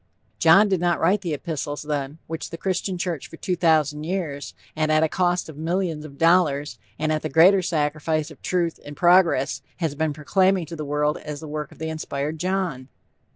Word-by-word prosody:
John 170 +6 +6
did 190 -3 +1
not 175 -1 +1
write 190 +5 +2
the 170 -5 -2
epistles, 145 -2 -4
then, 145 -1 -3
which 160 0 -5
the 165 - -7
Christian 185 +1 -2
church 175 -5 -3
for 165 - -12
two 180 - -1
thousand 155 -3 +2
years, 155 -6 -4 0.2
and 155 0 +1
at 155 0 +4
a - - +4
cost 175 +1 0
of 155 -3 -10
millions 165 -1 -1
of 140 -2 -11
dollars, 160 -4 +2 0.2
and 155 0 0
at 155 0 0
the 155 - -3
greater 180 +7 +6
sacrifice 155 -1 -1
of 150 - -15
truth 175 -2 -1
and 145 -1 -10
progress 175 -4 +4 0.2
has 165 -4 -1
been 155 +1 -1
proclaiming 185 +4 +2
to 165 +2 -8
the 155 -2 -5
world 150 +1 0
as 150 -1 -7
the 160 - -8
work 150 0 -5
of - - -15
the 160 0 -4
inspired 155 -1 -4
John! 180 -8 -2
160 Hz, 200 wpm, -23 LUFS, 150-175 Hz, 0.2 s, John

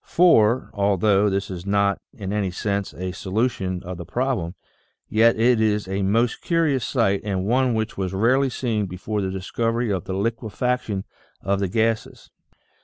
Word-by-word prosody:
For, 130 -9 +4
although 100 0 +2
this 100 0 -2
is 90 -2 -6
not 100 0 +1
in 100 -1 -5
any 105 -2 0
sense 100 +2 -2
a 90 +1 -5
so 95 +1 -8
lution 95 -5 -1
of 90 0 -6
the - - -5
problem, 95 -2 -2 0.5
yet 115 +1 +4
it 120 0 +4
is 105 -2 +1
a 95 +1 -2
most 110 +5 +1
curious 160 -7 +1
sight 110 -7 +1
and 95 -3 -2
one 125 +2 +2
which 110 -2 -3
was 95 -2 -1
rarely 125 +8 +2
seen 115 -5 -1
before 100 +4 -3
the 95 - -1
discovery 115 +5 -1
of 95 -4 -2
the 95 - -4
liquefac 115 +4 -1
tion 100 -3 -4 0.4
of 100 0 0
the 100 - 0
gases. 110 +3 -1
105 Hz, 175 wpm, -23 LUFS, 95-115 Hz, 0.5 s, For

